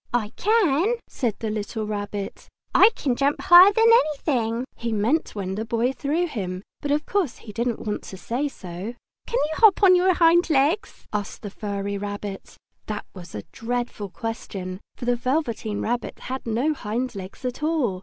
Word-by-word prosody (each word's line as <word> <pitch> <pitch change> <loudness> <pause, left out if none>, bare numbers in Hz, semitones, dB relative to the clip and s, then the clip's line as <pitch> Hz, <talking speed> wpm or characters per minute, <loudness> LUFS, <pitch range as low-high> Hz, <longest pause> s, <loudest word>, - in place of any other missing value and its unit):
"I 220 -4 0
can!" 400 - +2
said 235 -6 -2
the 220 -2 -3
little 215 +1 -3
Rabbit. 205 -1 -5 0.3
"I - - +8
can 260 -4 0
jump 280 +3 +1
higher 355 +3 +9
than 450 +2 +3
anything!" 275 - +3
He 235 0 -3
meant 225 +10 0
when 190 -2 -3
the 215 +3 -2
Boy 230 +3 0
threw 300 +6 0
him, 190 - -4 0.2
but 290 - -3
of 295 +1 +1
course 370 - 0
he 210 - -8
didn't 235 +1 -2
want 210 -1 -2
to 190 - -8
say 245 +10 -2
so. 190 -2 -7 0.3
"Can 475 - -1
you 310 -8 0
hop 425 -2 +6
on 375 -2 +8
your 365 0 +4
hind 340 +1 +5
legs?" 310 +8 +1
asked 210 +1 -4
the 205 - -5
furry 200 -1 -3
rabbit. 205 -1 -6 0.3
That 210 -1 -4
was 175 - -10
a 105 - -5
dreadful 235 -3 -3
question, 190 -4 -5 0.2
for - - -7
the 245 0 +2
Velveteen 240 -5 -1
Rabbit 240 +2 -2
had 260 -1 -5
no 245 +8 +1
hind 245 0 -3
legs 195 +5 -8
at 250 +3 -3
all! 300 - 0
240 Hz, 180 wpm, -24 LUFS, 205-300 Hz, 0.3 s, higher